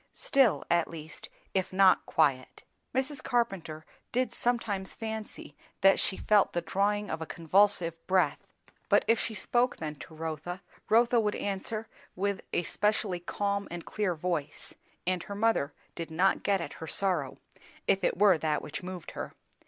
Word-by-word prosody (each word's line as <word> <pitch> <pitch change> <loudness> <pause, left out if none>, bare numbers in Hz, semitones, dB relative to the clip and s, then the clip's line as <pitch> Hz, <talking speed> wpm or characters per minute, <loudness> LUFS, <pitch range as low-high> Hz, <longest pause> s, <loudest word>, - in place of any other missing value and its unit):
Still, 265 -7 +3
at 170 -1 +3
least, 160 -1 -9 0.2
if 190 -1 0
not 190 0 +5
quiet; 140 -5 +1 0.3
Mrs. 265 +3 -1
Carpenter 190 -10 -1 0.3
did 255 +1 0
sometimes 225 -6 -1
fancy 220 -1 -6 0.3
that 195 0 +6
she 190 - 0
felt 210 -2 +3
the 175 - 0
drawing 205 +2 0
of 160 - -3
a 160 - -4
convulsive 175 0 +3
breath; 185 -1 +2 0.5
but - - +4
if 230 0 +4
she 220 - -2
spoke 245 +4 +1
then 155 -2 -4
to 160 - -11
Rotha, 160 +3 -5 0.3
Rotha 235 +2 +5
would 210 -2 0
answer 215 +3 -3 0.3
with 200 +1 -1
a - - +1
specially 205 0 0
calm 200 +3 -2
and 175 -1 -6
clear 205 -5 -1
voice; 155 -3 -3 0.3
and 180 0 +1
her 200 - -7
mother 210 -9 +2 0.2
did 165 0 -5
not 180 +5 +2
get 195 -2 +1
at - - -5
her 160 - -5
sorrow, 175 -9 0 0.5
if 195 -1 +3
it - - +1
were 195 -4 +5
that 150 -1 0
which 150 - -6
moved 180 -2 -7
her. - - -6
190 Hz, 160 wpm, -30 LUFS, 165-210 Hz, 0.5 s, that